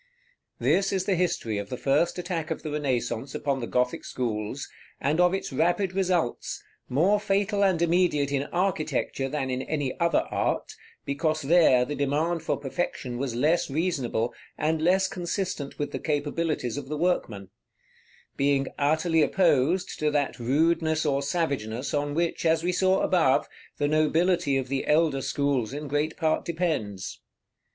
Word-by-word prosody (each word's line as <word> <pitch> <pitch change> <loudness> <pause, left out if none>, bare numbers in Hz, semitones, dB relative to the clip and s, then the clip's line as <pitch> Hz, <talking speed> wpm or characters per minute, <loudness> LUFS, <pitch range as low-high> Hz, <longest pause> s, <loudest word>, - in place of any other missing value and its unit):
This 195 0 +2
is 190 -1 0
the 200 - +2
history 170 - 0
of 100 0 -6
the 125 - -4
first 145 +8 +1
attack 175 -3 -3
of - - -4
the 155 - -4
Renaissance 130 -3 -2
upon 140 -2 -1
the 120 - -4
Gothic 125 0 0
schools, 115 +1 -3 0.3
and 150 +4 0
of 180 0 +5
its 190 -6 -3
rapid 175 +6 +1
results, 180 -8 -1 0.3
more 180 +11 +3
fatal 200 0 +1
and 190 -4 +3
immediate 170 -5 +2
in 140 0 0
architecture 155 -7 -1
than 135 -2 -2
in 130 0 -1
any 145 -3 -2
other 170 -2 +3
art, - - -1 0.3
because 155 +2 -1
there 140 -5 +5
the 145 - -4
demand 150 +4 0
for 160 - -1
perfection 135 -4 -3
was 130 -3 -2
less 150 +8 +2
reasonable, 135 -7 -1 0.2
and 155 +1 0
less 190 +3 +3
consistent 175 -5 -3
with 145 - -3
the - - -4
capabilities 150 -4 -1
of 140 -2 -5
the 150 - -2
workman; 115 - -1 0.8
being 140 -1 +1
utterly 160 +3 +2
opposed 170 +2 +2
to 155 - +2
that 145 -3 -1
rudeness 160 +5 +1
or 140 -2 +1
savageness 140 -6 -2
on 145 0 -1
which, 170 0 0
as 165 0 +2
we 180 - +1
saw 190 +1 +2
above, 165 -8 +3 0.3
the 145 - +1
nobility 155 0 +2
of 130 -1 -2
the 135 +1 -2
elder 150 -3 +3
schools 135 -5 0
in 150 +1 -5
great 145 +3 -1
part 160 -2 +1
depends. 155 - -3
150 Hz, 160 wpm, -26 LUFS, 135-175 Hz, 0.8 s, of